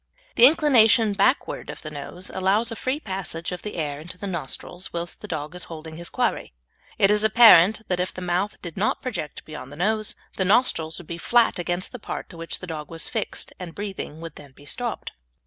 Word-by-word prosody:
The 240 - +9
inclination 235 -8 +5
backward 210 +8 +1
of - - -8
the 155 - -6
nose 165 +5 -4
allows 200 +5 +1
a - - -4
free 260 +5 -2
passage 190 - -4
of 180 - -5
the 210 - -6
air 145 -4 -3
into 170 +4 -9
the 200 - -6
nostrils 175 +1 -4
whilst 170 0 -4
the 210 - -7
dog 155 -3 -4
is 180 -1 -6
holding 160 -1 -9
his 170 0 -3
quarry. - - -1 0.4
It 195 - +5
is 210 0 +4
apparent 220 -1 +7
that 180 -1 -1
if 180 - -1
the - - -8
mouth 180 +3 -1
did 170 -1 -7
not 205 - 0
project 180 - -5
beyond 145 -4 -9
the - - -9
nose, 215 +5 0 0.2
the 190 - +2
nostrils 180 -6 +2
would 175 - -9
be 170 +1 -6
flat 235 0 +3
against 175 +1 -1
the 250 - -8
part - - -6
to 170 - -12
which 165 0 -3
the - - -5
dog 155 -4 -6
was 165 -2 -1
fixed, - - -3
and 175 -3 -8
breathing 195 -6 -6
would 165 -2 -8
then 140 -2 -13
be 145 - -17
stopped. 235 - -3
180 Hz, 215 wpm, -24 LUFS, 165-215 Hz, 0.4 s, The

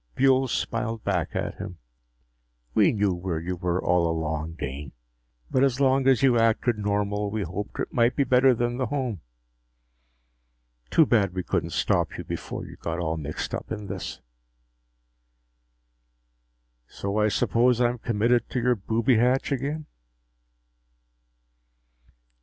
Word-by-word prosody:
Buehl 135 0 +4
smiled 115 -1 -2
back 90 -5 -1
at - - -3
him. 95 -4 -7 1.0
"We - - +4
knew 100 -3 +1
where 90 -2 -3
you 90 +3 -3
were 90 0 -1
all 90 -2 +2
along, 80 0 -2
Dane. 70 -3 -6 0.6
But 130 - +3
as 135 -1 +2
long 135 -1 +3
as 135 0 +4
you 125 -3 +5
acted 115 0 +2
normal, 105 0 -1
we 105 0 -2
hoped 95 +4 -6
it - - -3
might 120 +1 +3
be 140 - +3
better 130 0 +4
than 120 +1 -1
the 130 -2 -1
home. 125 - -3 1.7
Too 160 - +5
bad 100 -8 +2
we 90 - -2
couldn't - - -1
stop - - 0
you - - -5
before - - -5
you - - -11
got 85 0 -4
all 80 -2 -1
mixed 75 -1 -5
up - - -5
in 105 -2 -4
this." 95 -2 -6 2.7
"So 100 +2 -3
I 105 - +4
suppose 120 +3 +2
I'm 120 0 +1
committed 115 +1 +1
to 125 - -1
your 125 +1 +3
booby 115 +4 +1
hatch 125 +5 +2
again?" 145 +3 -2
110 Hz, 140 wpm, -26 LUFS, 90-125 Hz, 2.7 s, you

